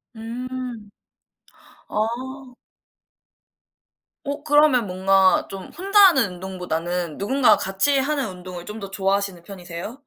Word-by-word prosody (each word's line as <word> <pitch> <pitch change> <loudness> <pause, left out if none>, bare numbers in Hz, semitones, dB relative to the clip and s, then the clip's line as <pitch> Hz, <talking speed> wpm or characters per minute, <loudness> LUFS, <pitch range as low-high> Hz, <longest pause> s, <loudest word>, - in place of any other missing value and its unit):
음. 240 -1 -6 1.0
아. 215 +1 0 2.2
어 285 +1 -5
그러면 295 -7 +4
뭔가 190 +1 +3
좀 195 -1 -8
혼자 395 +3 +2
하는 260 - +1
운동보다는 180 -2 -4
누군가가 230 +2 +3
같이 195 +9 +2
하는 275 -1 -1
운동을 180 -1 -9
좀 210 +3 -7
더 195 -1 -8
좋아하시는 195 -2 -1
편이세요? 180 +3 -8
200 Hz, 240 characters per minute, -22 LUFS, 185-255 Hz, 2.2 s, 그러면